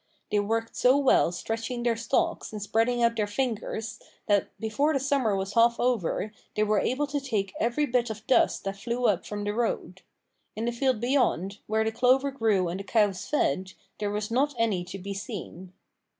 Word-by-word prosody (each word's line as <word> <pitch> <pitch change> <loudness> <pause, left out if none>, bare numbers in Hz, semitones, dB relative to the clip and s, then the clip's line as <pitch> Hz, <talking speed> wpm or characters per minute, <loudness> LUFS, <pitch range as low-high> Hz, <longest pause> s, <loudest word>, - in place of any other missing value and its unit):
They 210 - +3
worked 225 +2 -1
so 255 +2 +4
well 270 -10 +4
stretching 225 +6 -4
their 235 -1 +2
stalks 330 +9 -1
and 215 - -5
spreading 225 +4 +1
out 230 0 +3
their 210 -1 +1
fingers 225 -1 -3 0.3
that 205 -1 +2
before 230 +8 +1
the 275 - +1
summer 265 -6 +1
was 195 +1 -3
half 235 +1 +4
over 215 -3 0 0.2
they 215 - +2
were 215 -1 +2
able 275 +4 0
to 285 0 -3
take 210 -8 -2
every 240 +6 +1
bit 245 -3 +1
of 220 0 -7
dust 260 - +3
that 195 0 -4
flew 240 +4 -2
up 195 -5 +1
from 205 0 -4
the 205 0 -1
road. 210 -5 -2 0.5
In 220 +2 -3
the 240 - 0
field 245 -1 0
beyond, 235 - +1
where 220 +1 +1
the 220 - 0
clover 260 +4 +3
grew 220 -8 +1
and 175 +3 -3
the - - -5
cows 205 -3 +1
fed, 185 - 0 0.3
there 205 - -1
was 210 +2 -3
not 275 +4 +1
any 215 -6 +1
to 185 +2 -7
be 200 +1 -5
seen. 190 -3 -7
225 Hz, 195 wpm, -27 LUFS, 205-250 Hz, 0.5 s, so